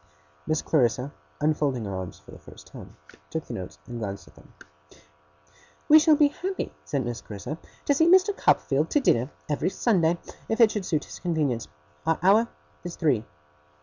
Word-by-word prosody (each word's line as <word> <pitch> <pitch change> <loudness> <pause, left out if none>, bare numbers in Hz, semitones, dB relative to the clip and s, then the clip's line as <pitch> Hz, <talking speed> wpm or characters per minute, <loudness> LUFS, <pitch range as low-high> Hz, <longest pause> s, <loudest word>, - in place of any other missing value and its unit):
Miss 155 0 0
Clarissa, 130 -1 +1 0.3
unfolding 145 -6 0
her 100 -1 -4
arms 95 -1 -6
for - - -17
the - - -12
first - - -14
time, - - -12 0.3
took 160 -1 -4
the - - -7
notes 90 -1 -7
and 120 -1 -7
glanced 100 -3 -5
at - - -18
them. - - -19 1.4
'We 310 +1 +9
shall 310 0 +5
be 290 -1 +5
happy,' 375 +5 -4
said 135 -4 -2
Miss 120 -1 -4
Clarissa, 110 +10 -7 0.3
'to 285 - +3
see 320 +4 +3
Mr. 375 +3 +5
Copperfield 145 - +2
to 295 - +3
dinner, 130 - +2 0.2
every 150 +4 0
Sunday, 175 -6 +2 0.3
if 225 - -1
it 225 -2 +7
should 205 -4 -3
suit 155 -3 0
his - - -10
convenience. 150 - -1 0.4
Our 165 - +3
hour 210 +5 +5 0.4
is 175 -1 -6
three. 130 -10 +1
155 Hz, 180 wpm, -26 LUFS, -, 1.4 s, We